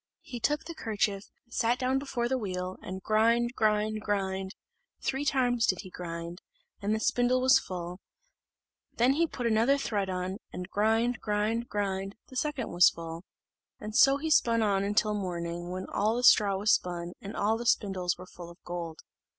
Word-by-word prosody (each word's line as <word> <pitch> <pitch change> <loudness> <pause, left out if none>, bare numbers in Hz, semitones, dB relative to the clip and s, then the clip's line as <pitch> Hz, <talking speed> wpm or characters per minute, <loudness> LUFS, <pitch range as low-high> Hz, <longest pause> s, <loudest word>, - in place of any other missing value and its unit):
He 245 - -7
took 295 +6 0
the 335 - -7
kerchief, 205 -6 -1 0.2
sat 235 +1 +1
down 260 +1 +1
before 255 -4 -2
the 260 +1 0
wheel, 185 -3 -4
and 185 0 -7
grind, 230 +3 +2
grind, 215 -1 +1
grind 195 -2 -2 0.5
three 270 +1 -2
times 245 -4 +2
did 185 - +1
he 185 - -12
grind 170 0 -6 0.4
and 205 +2 0
the - - -2
spindle 245 +3 +2
was 260 0 +5
full: 180 0 -6 1.0
then 245 +3 +4
he 330 +3 +2
put 250 -5 -5
another 230 +5 +3
thread 205 -8 -1
on, 185 +1 -3
and 180 0 -6
grind, 225 +3 +1
grind, 215 +3 -1
grind, 195 -1 -2
the 260 - -12
second 270 -3 -2
was 175 0 +7
full; 165 0 -8 0.7
so 270 +5 +5
he 315 +2 -3
spun 230 -5 +4
on 200 -1 +1
till 215 -1 +3
morning; 175 -3 -4
when 185 +1 -4
all 215 +3 +1
the 245 - -2
straw 205 -5 +6
was 205 +2 +3
spun, 175 -1 -1
and 200 +2 -7
all 210 +2 +1
the 235 +1 -4
spindles 190 -5 +1
were 180 - -10
full 175 -1 -11
of 170 - -13
gold. 170 -2 -5
210 Hz, 175 wpm, -29 LUFS, 185-240 Hz, 1.0 s, was